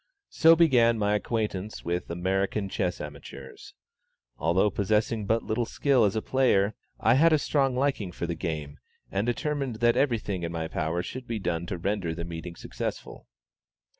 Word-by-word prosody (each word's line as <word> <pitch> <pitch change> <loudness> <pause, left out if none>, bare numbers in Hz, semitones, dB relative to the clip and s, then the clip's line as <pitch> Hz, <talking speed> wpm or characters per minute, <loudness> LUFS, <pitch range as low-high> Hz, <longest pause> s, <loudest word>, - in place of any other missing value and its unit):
So 165 +1 +6
began 125 -8 +4
my 105 -1 +1
acquaintance 105 -2 -2
with 85 +1 -2
American 95 +3 -1
chess 90 -3 -2
amateurs. 70 -2 -10 0.6
Although 85 +9 +2
possessing 105 +2 0
but 115 +2 +1
little 115 +2 -1
skill 135 -4 +2
as 100 - 0
a 110 - -1
player, 110 -6 +2 0.3
I 115 - +4
had 160 +6 +5
a 155 - +5
strong 135 -3 +1
liking 130 -8 0
for 85 - -4
the 85 - -2
game, 75 -4 -5 0.3
and 100 +4 -1
determined 135 0 -1
that 120 +1 +3
every 130 -5 +2
thing 100 -4 -4
in 85 0 -3
my 80 -1 -3
power 80 +2 -2
should 130 +6 -7
be 115 - -2
done 85 -3 -2
to 90 - -3
render 90 -2 -2
the 85 0 -5
meeting 85 +1 -7
successful. - - -6
105 Hz, 170 wpm, -27 LUFS, 85-120 Hz, 0.6 s, So